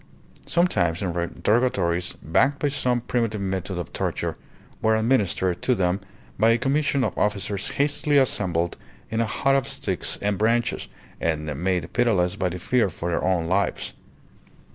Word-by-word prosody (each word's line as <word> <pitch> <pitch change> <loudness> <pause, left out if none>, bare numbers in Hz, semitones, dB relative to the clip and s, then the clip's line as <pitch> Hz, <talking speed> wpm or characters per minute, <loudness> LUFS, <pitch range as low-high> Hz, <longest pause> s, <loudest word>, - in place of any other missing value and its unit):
Sometimes 100 - +2
interrogatories, 90 +1 0
backed 140 - +2
by 145 - 0
some 125 -4 0
primitive 115 -3 -1
method 95 -1 -3
of 90 - -5
torture, - - -2 0.5
were 110 0 +3
administered 105 -6 +1
to 125 - +2
them 95 0 0 0.4
by 110 +2 +5
a 115 - +5
commission 140 +1 +1
of - - -1
officers 100 -1 -1
hastily 145 0 +1
assembled 90 -10 +1 0.3
in 115 +1 +1
a 115 - +1
hut 135 +5 +2
of 135 -1 +1
sticks 100 -9 -3
and 100 -1 -1
branches, 115 +3 +1 0.3
and 80 -2 -1 0.2
made 90 -4 0
pitiless 100 -8 +2
by 95 -2 0
the 90 - -5
fear 115 +4 +1
for 85 0 -4
their - - 0
own 90 -3 +1
lives. 95 +4 0
105 Hz, 150 wpm, -24 LUFS, 90-125 Hz, 0.5 s, by